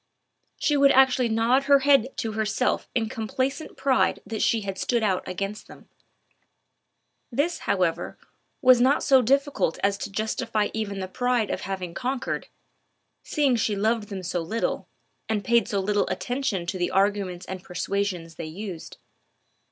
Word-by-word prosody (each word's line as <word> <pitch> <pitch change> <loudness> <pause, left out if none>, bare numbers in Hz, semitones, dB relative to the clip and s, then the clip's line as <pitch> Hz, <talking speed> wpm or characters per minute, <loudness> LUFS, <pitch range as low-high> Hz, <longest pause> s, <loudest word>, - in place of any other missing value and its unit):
She 295 - +1
would 280 -1 +6
actually 260 -2 +4
nod 235 +5 +2
her 280 0 +5
head 275 -2 +3
to 225 - -2
herself 220 +3 -1
in 230 -2 +1
complacent 260 +7 -3
pride 265 -2 +2
that 220 -1 -4
she 230 -2 +2
had 195 -2 -5
stood 235 -2 0
out 190 -3 +1
against 195 +3 -4
them. - - -15 1.4
This, 290 +8 0
however, 180 -4 0 0.5
was 255 -1 +7
not 265 +3 +3
so 265 -2 +5
difficult 275 - +1
as 200 0 +1
to - - -4
justify 215 0 -1
even 215 -3 -3
the 185 - -3
pride 245 +2 0
of - - -3
having 185 -3 -4
conquered, 255 +3 -3 0.7
seeing 280 -4 +1
she 220 -2 0
loved 215 +1 0
them 195 -2 -5
so 175 -1 -2
little, 215 +8 -2 0.4
and 210 -2 -1
paid 235 -3 +3
so 205 -4 -1
little 205 +1 +1
attention 245 -8 -2
to 185 +1 -4
the 175 - 0
arguments 195 -2 0
and 185 -1 -7
persuasions 180 -2 -3
they - - -5
used. 180 0 -7
220 Hz, 155 wpm, -25 LUFS, 195-255 Hz, 1.4 s, was